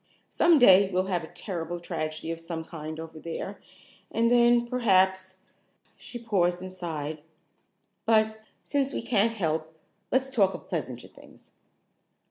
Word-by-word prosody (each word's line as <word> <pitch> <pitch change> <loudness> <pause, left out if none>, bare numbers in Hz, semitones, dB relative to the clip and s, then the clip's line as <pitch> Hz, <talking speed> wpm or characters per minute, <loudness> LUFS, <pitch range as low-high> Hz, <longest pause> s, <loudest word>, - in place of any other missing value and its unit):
Some 340 -1 +4
day 195 -6 +7
we'll 185 0 +1
have 175 -2 0
a - - -7
terrible 175 -1 -5
tragedy 160 -2 -4
of 165 - -5
some 165 -1 -5
kind 155 -1 -7
over 160 -1 -8
there, 170 +5 -6 0.5
and 230 +1 +1
then 240 0 +5
perhaps 190 -6 +2 0.3
" - - -39
she 245 - -9
paused 185 -7 +1
and 185 0 -8
sighed. 155 -4 -5 0.9
"But, 220 -1 +3 0.2
since 280 -1 0
we - - -3
can't 230 -1 +2
help, 160 -5 -2 0.3
let's 265 +1 +1
talk 200 -7 +2
of - - -11
pleasanter 130 -8 -4
things." - - -18
185 Hz, 145 wpm, -27 LUFS, 165-230 Hz, 0.9 s, day